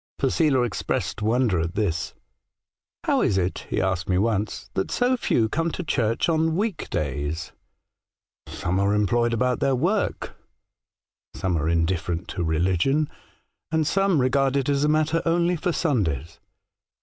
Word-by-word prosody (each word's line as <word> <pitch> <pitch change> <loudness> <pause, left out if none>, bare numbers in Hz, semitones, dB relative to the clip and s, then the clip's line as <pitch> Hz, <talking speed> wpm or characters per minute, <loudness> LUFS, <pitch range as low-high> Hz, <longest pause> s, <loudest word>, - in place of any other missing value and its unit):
Posela 135 -1 +2
expressed 110 -1 -3
wonder 110 -3 +2
at 85 +3 -3
this. 90 -7 -1 0.4
' - - -69
How - - +2
is 95 - +2
it,' 90 0 -2
he - - 0
asked 95 -1 -1
me 90 - +2
once, 105 -1 -1
* - - -39
that 95 - -1
so 250 +1 +2
few 115 - +1
come 165 +8 -1
to 185 - -4
church 115 -6 0
on 160 -1 +1
week 205 -3 -2
days? 75 +4 -3 0.3
' - - -62
" - - -69
' - - -35
Some 90 +2 -2
are 100 +1 +2
employed 120 +3 +2
about 125 +2 +1
their 135 -1 +2
work, 185 - -1 1.0
some 95 -2 -1
are 80 0 0
indifferent 85 +1 0
to 90 - -3
religion, 90 - +1 0.6
and 160 -1 +1
some 195 0 +2
re 130 0 +3
gard 135 +1 +2
it 135 0 0
as 140 0 +2
a 150 - +3
matter 155 +2 +2
only 170 +1 +2
for 175 +2 -1
Sundays.' 85 - -1
120 Hz, 170 wpm, -24 LUFS, -, 1.0 s, re